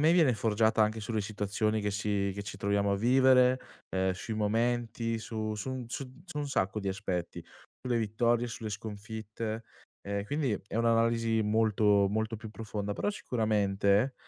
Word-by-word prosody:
me 155 +3 +5
viene 160 -8 +5
forgiata 110 +1 +2
anche 110 +1 0
sulle 110 0 -2
situazioni 105 +1 -1
che 105 - 0
si 100 -1 0
che 100 - -4
ci 100 0 -7
troviamo 100 0 +1
a - - +2
vivere, 130 +2 +5 0.3
ehm, 95 0 +2
sui 95 +4 -6
momenti 115 +1 0
su 110 -1 -3
su 130 +4 -4
su 130 +2 -5
su 175 -5 -6
un 145 -1 -2
sacco 100 -5 0
di 100 - -2
aspetti, 95 -3 -3 0.4
sulle 125 -2 +1
vittorie, 115 +2 +1
sulle 115 -2 -5
sconfitte. 110 +1 -5 0.6
Quindi 145 -1 0 0.2
è - - -4
un'analisi 115 -1 +2
molto, 105 -2 +3
molto 110 +2 -1
più 110 +1 -8
profonda, 105 -2 -4
però 205 - -1
sicuramente, 105 - +1
110 Hz, 155 wpm, -30 LUFS, 105-115 Hz, 0.6 s, me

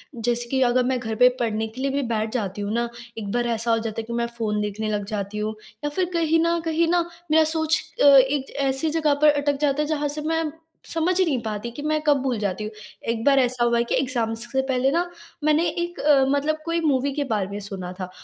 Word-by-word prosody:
जैसे 240 +1 -1
कि 265 -1 +1
अगर 250 0 +3
मैं 255 0 0
घर 225 -2 -4
पर 250 +2 +5
पढ़ने 220 -1 -1
के 230 +4 -9
लिए 275 - 0
भी 280 +1 0
बैठ 220 0 -1
जाती 205 -4 -2
हूँ 205 +2 -2
ना, 235 0 0 0.3
एक 205 -3 -4
बार 240 0 0
ऐसा 230 +1 -1
हो 225 - +4
जाता 225 0 -4
है - - -9
कि 235 - -7
मैं 235 0 0
फ़ोन 210 -2 -1
देखने 210 +1 -3
लग 205 -1 -1
जाती 200 +1 -4
हूँ 215 +1 -2 0.3
या 295 - 0
फिर 360 +5 0
कहीं 330 -1 +2
न 340 0 +2
कहीं 325 +1 +2
ना 350 -1 +4 0.3
मेरा 320 0 +6
सोच 315 0 +1 0.2
अ, - - +5
एक 275 0 +5
ऐसी 270 +4 0
जगह 310 -2 +2
पर 305 - +7
अटक 285 -1 0
जाता 290 0 +2
है 300 - -1
जहाँ 295 -1 0
से - - -2
मैं 325 - +1 0.5
समझ 330 +2 +1
ही 375 - +5
नहीं 280 -7 0
पाती 220 +1 -4
कि 290 - -8
मैं 310 +1 0
कब 295 -2 +3
भूल 255 -3 -1
जाती 205 0 -2
हूँ। 215 - -5 0.4
एक 230 -1 -1
बार 275 -1 +5
ऐसा 250 -1 +1
हुआ 235 0 +3
है 235 - +3
एग्ज़ाम्स 230 -4 -1
से 265 - +2
पहले 265 0 +1
ना 340 +4 +1 0.4
मैंने 305 +3 +3
एक 345 +1 -4
अ, 285 -2 +4
मतलब 285 +3 +1
कोई 335 0 0
मूवी 280 -2 +1
के 290 - -1
बारे 215 -8 -1
में 200 +1 -5
सुना 195 -3 -6
था 185 -1 -4
255 Hz, 250 wpm, -24 LUFS, 225-300 Hz, 0.5 s, पर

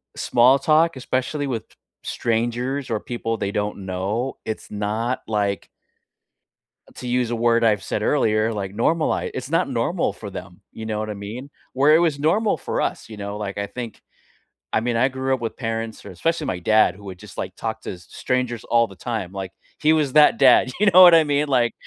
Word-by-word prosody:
small 125 +3 +4
talk, 155 +3 +3
especially 130 +3 -2
with 120 -5 -3 0.4
strangers 120 +4 -2
or 110 -2 -1
people 115 -2 -4
they 100 - -2
don't 105 -1 -3
know, 100 +8 -3
it's 110 - -6
not 110 +4 -2
like 100 -3 -1 1.3
to 125 - -8
use 125 -1 0
a - - 0
word 115 0 +2
I've 105 -3 +3
said 105 - -3
earlier, 110 -5 +2
like, 100 -1 -5
normali 155 +8 0
it's - - -5
not - - +1
normal - - -1
for - - -9
them, - - -10
you 110 - -8
know 105 -1 -2
what 110 - -3
I 105 - -4
mean? 110 +8 -7 0.2
Where 145 +4 +5
it 160 - +5
was 160 -5 +1
normal 200 +9 +2
for - - -3
us, - - -3
you 110 - -9
know, 100 0 -5
like 100 -2 -5
I 100 - -1
think 120 +1 -7 0.7
I - - +2
mean, 120 +1 -1
I 120 +3 +4
grew 130 0 -2
up 130 - -4
with 115 -1 -4
parents 115 -2 -4
or - - -9
especially 165 -2 -1
my 90 - -2
dad, 110 0 +3
who 100 - -15
would 95 -2 -8
just - - -13
like - - -4
talk - - -4
to - - -5
s 90 -2 -12
strangers 125 -3 -2
all 115 -1 +2
the 95 - -14
time, 110 -4 -4
like, 95 -2 -6 0.3
he 155 +1 +4
was 150 -4 +1
that 150 -1 +6
dad, 130 -1 +5
you 210 - +4
know 185 +2 +9
what 175 -2 +9
I 165 - +7
mean? 145 0 +1
Like, 120 -4 +2
115 Hz, 210 wpm, -22 LUFS, 105-135 Hz, 1.3 s, know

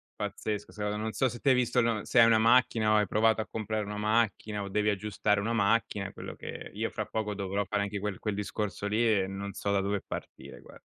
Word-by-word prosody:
Pazzesco, 105 0 -4
secondo 105 -1 -3
non 110 +1 -2
so 130 - +2
se 120 - -8
te 140 - +2
hai 130 - +6
visto 125 0 +2
l 115 -3 +1
se 125 - +3
hai - - +9
una 115 -1 +5
macchina 115 -1 +4
o - - +5
hai 105 -1 +2
provato 110 +3 +3
a - - -6
comprare 110 0 -2
una 105 +1 -5
macchina, 105 -1 0
o 100 - -5
devi 105 +2 +1
aggiustare 105 0 0
una 110 +3 -1
macchina, 100 -3 +1
quello - - -8
che - - -8
io - - -1
fra - - -3
poco 105 -1 -2
dovrò 100 0 -2
fare 105 +2 -1
anche 100 0 -2
quel 100 -2 -3
quel 105 -2 -2
discorso 105 0 -3
lì 110 +3 +1 0.2
e - - -1
non 100 +1 -5
so 100 +1 -2
da 100 -1 +2
dove 100 0 -1
partire - - -8
guar - - -15
105 Hz, 240 wpm, -29 LUFS, 100-110 Hz, 0.2 s, hai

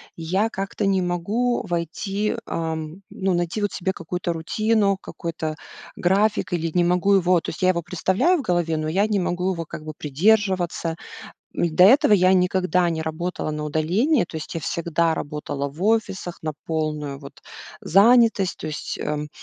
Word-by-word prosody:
я 185 +7 0
как-то 195 0 -3
не 190 -1 +2
могу 205 +8 -1
войти, 195 +5 -2
ам, 160 +2 -4
ну, 190 -1 -1
найти 175 +4 -2
вот 205 - 0
себе 190 +2 -2
какую-то 175 0 -3
рутину, 200 +4 +1
какой-то 165 -4 -5 0.4
график 200 +2 +1
или 165 -1 -1
не 175 - +3
могу 180 +3 +2
его, 180 -2 +4
то - - -5
есть 155 - -7
я 185 - +4
его 170 -2 0
представляю 190 - +1
в - - -2
голове, 175 -7 0
но 155 0 -2
я 190 +6 +2
не 210 -2 0
могу 180 +1 -1
его, 165 -2 -5
как 155 - -8
бы, 155 - -6
придерживаться. 175 +1 +1 0.6
М, 170 -2 -1
до 180 - +8
этого 215 +1 +6
я 185 -1 +4
никогда 180 -1 +2
не 160 -1 -2
работала 160 +1 -3
на 150 0 -4
удаление, 180 - +1
то 165 -2 -7
есть 155 - -8
я 165 - -3
всегда 170 +1 0
работала 145 -2 -4
в 150 +6 -9
офисах 210 -5 0
на 155 -1 -3
полную, 150 -3 -3
вот, 140 -1 -13 0.4
занятость, 220 0 +4
то - - -7
есть, 155 - -5
эм, 150 0 -3
175 Hz, 175 wpm, -23 LUFS, 160-195 Hz, 0.6 s, до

